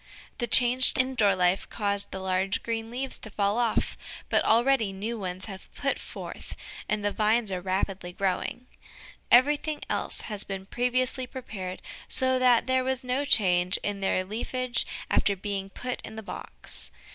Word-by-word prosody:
The 240 - 0
change 250 +2 +5
to 265 - +5
indoor 250 -7 +2
life 180 +1 +1
caused 200 -2 +3
the - - -4
large 190 +1 0
green 225 -1 -3
leaves 255 +3 -4
to 220 - -6
fall 205 +2 0
off, 235 -2 0 0.3
but - - +3
already 235 -2 +3
new 215 +4 -4
ones 185 -1 -4
have 195 -3 -10
put 275 -1 -1
forth, - - -8 0.3
and 210 -1 0
the 205 - +2
vines 215 0 +1
are 185 -1 -2
rapidly 190 -1 -2
growing. 195 +6 -2 0.6
Everything 295 +5 +4
else - - 0
had 210 -2 -4
been 195 -1 -5
previously 255 +3 0
prepared 195 -8 -7 0.2
so 260 0 +2
that 250 -2 +5
there 260 0 +2
was 260 0 -1
no 255 +3 0
change 185 -8 +4
in 205 -1 -2
their 190 -1 +1
leafage 240 +4 -1 0.2
after 200 - +3
being 195 0 -4
put 250 +5 -5
in 220 - -9
the 220 - -7
box. - - -4
220 Hz, 165 wpm, -27 LUFS, 195-250 Hz, 0.6 s, change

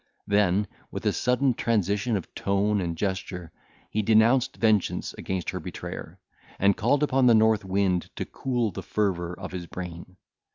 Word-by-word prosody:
Then, 100 -1 +2 0.2
with - - -6
a - - +3
sudden 125 +2 +2
transition 105 0 0
of 95 - -8
tone 100 +1 +1
and 85 -2 -3
gesture, 95 -3 -3 0.4
he 110 - +1
denounced 115 +4 +3
vengeance 110 -4 +1
against 95 -2 -3
her - - -4
betrayer, - - -7 0.4
and 100 0 +3
called 135 +7 +2
upon 135 -3 +3
the 120 - +7
north 110 -1 +4
wind 95 -2 0
to - - -3
cool 120 -5 -1
the - - -6
fervour 90 -4 -1
of 95 - -6
his 90 -2 -6
brain. 90 +1 -8
100 Hz, 160 wpm, -26 LUFS, 95-110 Hz, 0.4 s, the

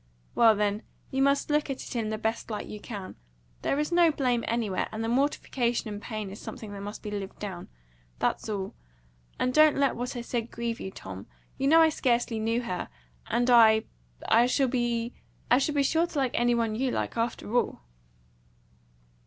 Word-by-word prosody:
"Well, 225 -2 +6
then, 205 0 0 0.3
you 265 - 0
must 280 +2 +2
look 300 0 +1
at 270 - -4
it - - -8
in 225 -2 -1
the 215 - -2
best 225 +2 -2
light 215 - -4
you 210 - -8
can. 200 -3 -7 0.4
There - - 0
is 300 +3 -1
no 345 -1 +5
blame 250 -5 0
anywhere, 225 -5 -1
and 220 +1 -4
the - - -1
mortification 245 -2 0
and 205 - -7
pain 215 -4 -5
is 200 - -9
something 215 -2 -8
that 200 - -7
must 205 +2 -7
be 210 - -5
lived 200 -2 -5
down. 190 -4 -6 0.5
That's - - -1
all. 195 -2 -3 0.6
And 255 - 0
don't 310 0 +6
let 275 -1 +2
what 245 +2 -4
I 240 - -3
said 235 -1 -3
grieve 235 0 -3
you, - - -5
Tom. 95 - -9 0.3
You 270 - +1
know 325 +3 +7
I 320 - +6
scarcely 240 -6 0
knew 230 +2 0
her, 185 -6 -4 0.4
and 240 +1 +1
I 220 -2 +7 0.4
I 235 +2 +5
shall 265 +1 +2
be 240 -1 -1 0.7
sure 325 +5 +2
to 320 - -7
like 265 -3 +1
any 240 0 +2
one 230 -2 0
you 255 +4 0
like, - - -2
after 230 -1 -2
all." 245 - +1
235 Hz, 190 wpm, -28 LUFS, 215-260 Hz, 0.7 s, know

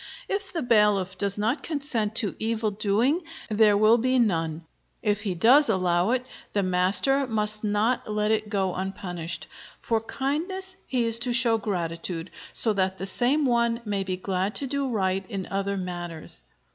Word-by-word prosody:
If 395 -1 -2
the 330 - -2
bailiff 210 -5 +3
does 200 +1 -1
not 230 +7 0
consent 270 -9 -2
to 220 -4 +2
evil 220 -1 -1
doing 215 - +1 0.3
there 210 -1 +4
will 215 +3 +5
be 255 +2 +2
none. 165 -8 0 0.4
If 205 -2 +1
he 195 -4 -2
does 250 - +5
allow 180 -2 +2
it, 255 +1 0 0.3
the 200 - +1
master 190 +10 +3
must 215 -2 -1
not 215 +2 0
let 210 0 +1
it 215 -1 0
go 190 -3 0
unpunished. 175 -3 -4 0.3
For 225 -1 0
kindness 345 - -3
he 250 -3 0
is 230 0 +1
to 240 0 0
show 235 -2 +3
gratitude, 170 -3 -4 0.2
so 220 - +4
that 190 -1 0
the 190 - -4
same 255 +9 +2
one 235 -2 +2
may 200 -2 -1
be 185 -1 -3
glad 190 +2 -2
to 280 - -2
do 275 0 -2
right 195 -4 0
in 195 -2 -4
other 200 0 -1
matters. 175 -3 -4
210 Hz, 170 wpm, -26 LUFS, 190-240 Hz, 0.4 s, will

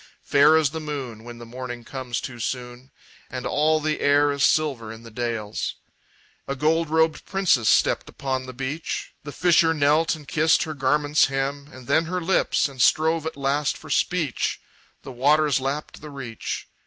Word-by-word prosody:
Fair 145 +3 +5
as 155 -3 +2
the 160 - -4
moon 135 -8 -6
When 120 0 -9
the 120 - -10
morning 120 0 -7
comes 125 -2 -4
too 120 -3 -7
soon, 125 +1 -5 0.4
And 130 -1 -6
all 155 +1 +2
the 155 0 -1
air 145 0 +3
is 140 0 -3
silver 135 -8 +1
in 115 +1 -11
the 115 - -12
dales, 115 -2 -3 0.7
A 140 - -2
gold 160 +3 +1
robed 160 0 +2
princess 175 - +2
stepped - - +2
upon 130 -1 -3
the - - -6
beach. 135 +5 -4
The 145 - -7
fisher 165 0 +3
knelt 150 +3 +3
and 150 -3 -13
kissed 160 +1 +3
her 155 - -5
garment's 145 +2 +2
hem, 135 +1 -3
And 130 -1 -12
then 160 +6 +2
her 180 +2 -2
lips, 180 -2 +1
and 135 -3 -6
strove 160 +3 +3
at 160 - -6
last 140 +1 0
for - - -11
speech. 165 -8 0 0.4
The 135 - -8
waters 145 +2 +3
lapped 140 +3 -4
the 150 - -9
reach. 125 -6 -6
140 Hz, 180 wpm, -24 LUFS, 130-155 Hz, 0.7 s, Fair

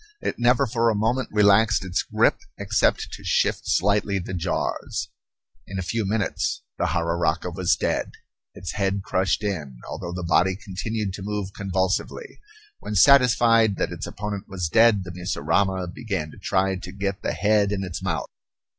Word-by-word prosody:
It - - -3
never 125 +3 +4
for 115 -1 +1
a 110 - +1
moment 115 +5 0
relaxed 105 0 +4
its 90 -1 0
grip - - +2 0.2
except - - +1
to - - -9
shift - - +1
slightly 100 +1 +2
the 95 0 -5
jaws. 90 0 -2 0.6
In 95 - -6
a 95 - -2
few 105 +4 -2
minutes 105 0 -1 0.2
the - - +1
jararaca 85 +1 0
was 95 +3 +2
dead, - - -1 0.5
its - - -5
head 100 -1 -1
crushed 95 +2 0
in, 80 -11 -3
although 85 - -5
the 90 0 -5
body 95 +2 +3
continued 105 +1 -4
to 100 - -7
move 100 -1 -4
convulsively. 95 - -2 0.4
When 105 - -5
satisfied 115 -1 +5
that - - -2
its - - -5
opponent 105 -1 -5
was 90 -5 -3
dead, 110 0 +5
the 90 - -8
mussurama 90 +1 0
began 95 -10 -4
to - - -14
try 95 0 0
to 90 0 -8
get 100 0 -3
the - - -1
head 105 +3 +2
in 100 -1 -1
its 90 -3 -5
mouth. - - -2
100 Hz, 165 wpm, -24 LUFS, 90-105 Hz, 0.6 s, satisfied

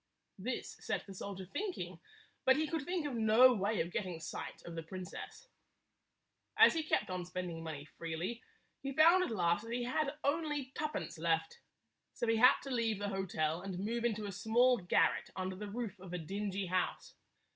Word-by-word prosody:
This 245 +7 -4
set - - -2
the 195 - -9
soldier 190 0 -6
thinking, 365 - -4 0.4
but 260 - +6
he 310 +3 +1
could 320 +1 -2
think 350 -2 -1
of 290 - -2
no 230 +3 +6
way 205 0 +1
of 170 +2 -3
getting 185 -6 -3
sight 160 - -6
of 170 - -7
the 165 - -4
princess. 185 - -8 1.1
As - - +8
he 325 - 0
kept 310 -10 0
on 180 -1 -2
spending 180 -2 -5
money 155 -3 -6
freely, 165 +10 -4 0.4
he 275 0 -3
found 335 +6 +7
at - - -2
last 175 -4 +2
that 230 - -7
he 245 0 -1
had 275 +4 0
only 295 -2 0
twopence 300 - -3
left. 160 -1 0 0.5
So - - -2
he 225 -1 +3
had 250 +3 +7
to 275 - -6
leave 230 -4 +1
the 205 0 -2
hotel 175 -4 -1
and 190 -1 -5
move 230 +5 -2
into 215 -3 0
a 200 - -4
small 235 +5 +3
garret 175 - +2
under 185 0 -3
the 205 +2 -6
roof 210 -3 -4
of 180 -1 -9
a - - -1
dingy 195 +3 -3
house. 185 0 -1
205 Hz, 190 wpm, -35 LUFS, 180-255 Hz, 1.1 s, As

